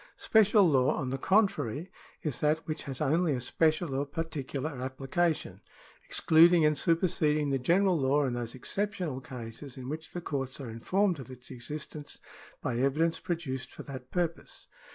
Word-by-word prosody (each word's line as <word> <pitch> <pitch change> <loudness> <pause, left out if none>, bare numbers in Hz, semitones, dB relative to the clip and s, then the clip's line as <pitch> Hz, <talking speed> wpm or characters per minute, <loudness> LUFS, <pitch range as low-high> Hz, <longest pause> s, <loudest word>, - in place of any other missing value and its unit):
Special 210 -2 +5
law, 135 -4 +3
on 130 -2 -3
the 135 - -2
contrary, 190 - +1 0.3
is 150 -6 -2
that 155 +2 +1
which 155 -1 -4
has 135 0 -5
only 155 +2 +2
a 130 - -1
special 155 +4 +1
or 135 +1 0
particular 145 -1 -4
application, 140 +6 -1 0.4
ex - - -2
cluding 165 0 +6
and 150 0 +3
superseding 155 -3 +2
the 135 - +1
general 185 +7 +3
law 140 +2 +2
in 130 - -1
those 120 -1 -4
exceptional 180 - -3
cases 125 +2 -8
in 130 0 -6
which 160 +2 -6
the 175 - -3
courts 135 -5 -3
are 125 -5 -6
informed 185 - +1
of 130 - -9
its 125 0 -10
existence 145 +4 -6 0.4
by 120 -2 -1
evidence 155 +5 +1
produced 135 -7 -4
for - - -9
that 130 -2 -8
purpose. 175 -2 -3
150 Hz, 165 wpm, -30 LUFS, 130-165 Hz, 0.4 s, cluding